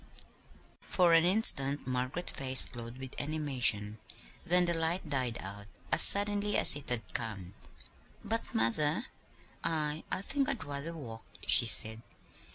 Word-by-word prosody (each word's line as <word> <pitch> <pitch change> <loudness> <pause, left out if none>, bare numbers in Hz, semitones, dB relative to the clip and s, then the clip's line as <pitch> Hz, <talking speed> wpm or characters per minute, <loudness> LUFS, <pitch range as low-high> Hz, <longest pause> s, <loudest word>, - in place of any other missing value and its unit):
For 175 -3 0
an 165 0 +3
instant 150 -8 +2
Margaret's 130 +7 -5
face 130 -1 +5
glowed 120 0 -12
with 130 -1 -11
animation; 125 -9 -2 0.4
then 180 +1 +1
the 175 - -2
light 165 +1 -4
died 130 -5 -3
out 100 +1 -10 0.2
as - - +2
suddenly 205 0 +5
as - - +9
it 145 - -9
had 120 -2 -4
come. 100 -6 -6 0.7
"But, 225 +1 -5
mother, 145 - -2 0.6
I 155 -1 -4
I 190 - -4
think 275 +4 -3
I'd 245 - -6
rather 145 +4 -8
walk," 115 -7 -11 0.2
she 120 - +5
said. 110 0 +1
140 Hz, 140 wpm, -29 LUFS, 120-170 Hz, 0.7 s, as